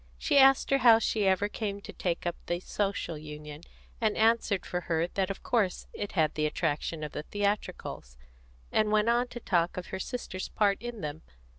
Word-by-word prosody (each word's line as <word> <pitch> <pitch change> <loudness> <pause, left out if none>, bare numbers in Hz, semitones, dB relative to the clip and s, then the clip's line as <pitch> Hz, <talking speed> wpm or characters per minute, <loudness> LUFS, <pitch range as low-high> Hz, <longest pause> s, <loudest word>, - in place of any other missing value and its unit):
She 280 - +3
asked 270 0 +6
her 275 - +4
how 235 -2 +8
she 215 -2 +1
ever 190 +2 +3
came 205 -1 -4
to - - -9
take 175 -1 -2
up 175 - -1
the 175 0 -1
Social 195 -4 -2
Union, 150 0 -9 0.4
and 215 -2 +1
answered 225 -4 +2
for 180 - -2
her 165 0 +2
that 190 0 -1
of 195 - -6
course 210 -7 0
it 205 - -5
had 160 -4 +2
the 155 0 +1
attraction 155 0 -2
of 150 - -4
the - - -4
theatricals, 200 - -3 0.5
and 215 -1 +2
went 215 +1 +3
on 240 +1 +2
to 240 - -8
talk 175 -6 0
of 180 - -5
her 190 - -4
sister's 190 -3 -5
part 200 -2 +1
in 240 -3 -6
them. 150 +1 -5
195 Hz, 195 wpm, -29 LUFS, 165-220 Hz, 0.5 s, how